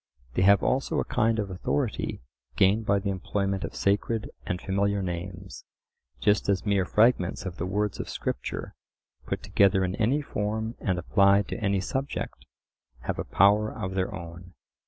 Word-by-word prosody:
They -, -, +1 dB
have 100 Hz, +1 st, +5 dB
also 135 Hz, +1 st, +1 dB
a -, -, +1 dB
kind 115 Hz, 0 st, +1 dB
of 100 Hz, -3 st, -2 dB
authority 105 Hz, -, -2 dB, 0.3 s
gained 100 Hz, +7 st, +3 dB
by 100 Hz, -, +4 dB
the 100 Hz, 0 st, -1 dB
employment 95 Hz, +1 st, -2 dB
of -, -, -5 dB
sacred 105 Hz, +2 st, 0 dB, 0.2 s
and 90 Hz, 0 st, -1 dB
familiar 100 Hz, +1 st, 0 dB
names, 90 Hz, +1 st, -6 dB, 0.6 s
just 100 Hz, +8 st, +2 dB
as 95 Hz, -1 st, +1 dB
mere 100 Hz, -3 st, +2 dB
fragments 105 Hz, -3 st, +2 dB
of 90 Hz, -2 st, -5 dB
the 90 Hz, -, -2 dB
words 105 Hz, +1 st, -1 dB
of -, -, -4 dB
Scripture, 60 Hz, -, -4 dB, 0.5 s
put -, -, -3 dB
together 95 Hz, -1 st, +3 dB
in 90 Hz, -, -2 dB
any 130 Hz, +7 st, +2 dB
form 110 Hz, -1 st, -2 dB
and 95 Hz, -3 st, 0 dB
applied 100 Hz, +3 st, +4 dB
to -, -, -4 dB
any 100 Hz, -1 st, +2 dB
subject, 135 Hz, +8 st, -4 dB, 0.5 s
have -, -, -3 dB
a -, -, -1 dB
power 105 Hz, +3 st, +4 dB
of 95 Hz, 0 st, -5 dB
their 95 Hz, -1 st, -1 dB
own. 90 Hz, 0 st, -9 dB
100 Hz, 165 wpm, -27 LUFS, 95-105 Hz, 0.6 s, have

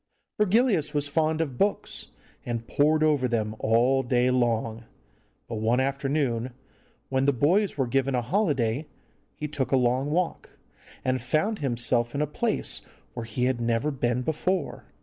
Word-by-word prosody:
Virgilius 205 Hz, -, +2 dB
was 145 Hz, -1 st, 0 dB
fond 155 Hz, +2 st, +1 dB
of 140 Hz, -6 st, -4 dB
books, 205 Hz, +1 st, -1 dB, 0.4 s
and 115 Hz, -1 st, -4 dB
pored 155 Hz, +2 st, +3 dB
over 145 Hz, -5 st, +3 dB
them 110 Hz, -3 st, -1 dB
all 120 Hz, +4 st, +3 dB
day 125 Hz, 0 st, +2 dB
long. 115 Hz, -2 st, 0 dB, 0.6 s
But 115 Hz, -, -4 dB
one 115 Hz, +3 st, +2 dB
afternoon, 135 Hz, -3 st, -1 dB, 0.6 s
when 130 Hz, 0 st, +1 dB
the 140 Hz, -, +5 dB
boys 175 Hz, -, +2 dB
were 135 Hz, -, +1 dB
given 135 Hz, +2 st, 0 dB
a 125 Hz, -, 0 dB
holiday, 145 Hz, -, 0 dB, 0.5 s
he 150 Hz, -, -4 dB
took 140 Hz, -3 st, -3 dB
a 135 Hz, -, +4 dB
long 130 Hz, +3 st, +1 dB
walk, 170 Hz, +3 st, -2 dB, 0.5 s
and 130 Hz, -1 st, +1 dB
found 155 Hz, -, 0 dB
himself 120 Hz, -2 st, 0 dB
in 140 Hz, -, 0 dB
a -, -, +1 dB
place 220 Hz, -, -1 dB, 0.3 s
where 115 Hz, -2 st, -6 dB
he 120 Hz, +3 st, -2 dB
had 130 Hz, -2 st, 0 dB
never 115 Hz, +5 st, +1 dB
been 125 Hz, -2 st, -1 dB
before. 165 Hz, +4 st, -2 dB
135 Hz, 155 wpm, -26 LUFS, 120-155 Hz, 0.6 s, the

